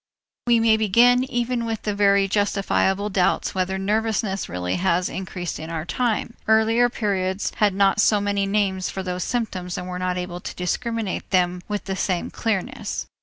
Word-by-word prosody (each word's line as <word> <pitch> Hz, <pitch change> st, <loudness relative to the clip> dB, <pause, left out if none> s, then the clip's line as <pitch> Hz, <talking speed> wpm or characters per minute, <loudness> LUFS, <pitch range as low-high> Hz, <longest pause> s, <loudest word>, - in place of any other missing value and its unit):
We 235 Hz, -1 st, +5 dB
may 225 Hz, -1 st, +4 dB
begin 235 Hz, +4 st, +4 dB
even 245 Hz, -2 st, -1 dB
with 225 Hz, -2 st, -3 dB
the 210 Hz, -, -1 dB
very 200 Hz, -1 st, +3 dB
justifiable 200 Hz, 0 st, +1 dB
doubt 185 Hz, -2 st, +1 dB
whether 190 Hz, 0 st, -1 dB
nervousness 210 Hz, 0 st, -1 dB
really 90 Hz, 0 st, -2 dB
has 180 Hz, -1 st, +1 dB
increased 180 Hz, -3 st, -5 dB
in 160 Hz, +1 st, -7 dB
our 165 Hz, -1 st, -4 dB
time. 230 Hz, +2 st, -1 dB
Earlier 225 Hz, +2 st, +4 dB
periods 195 Hz, -4 st, -1 dB
had 205 Hz, -3 st, +2 dB
not 195 Hz, +1 st, +3 dB
so 210 Hz, -1 st, +4 dB
many 200 Hz, -1 st, 0 dB
names 195 Hz, -2 st, 0 dB
for 190 Hz, -, -5 dB
those 180 Hz, -1 st, -3 dB
symptoms 190 Hz, -7 st, -3 dB
and 180 Hz, -, -5 dB
were 180 Hz, 0 st, -5 dB
not 180 Hz, 0 st, -1 dB
able 180 Hz, -1 st, -4 dB
to -, -, -7 dB
discriminate 225 Hz, +3 st, -2 dB
them 180 Hz, -1 st, +1 dB
with 205 Hz, -1 st, -3 dB
the 190 Hz, -, -3 dB
same 185 Hz, -2 st, -1 dB
clearness. 225 Hz, +3 st, -3 dB
200 Hz, 170 wpm, -23 LUFS, 185-220 Hz, -, We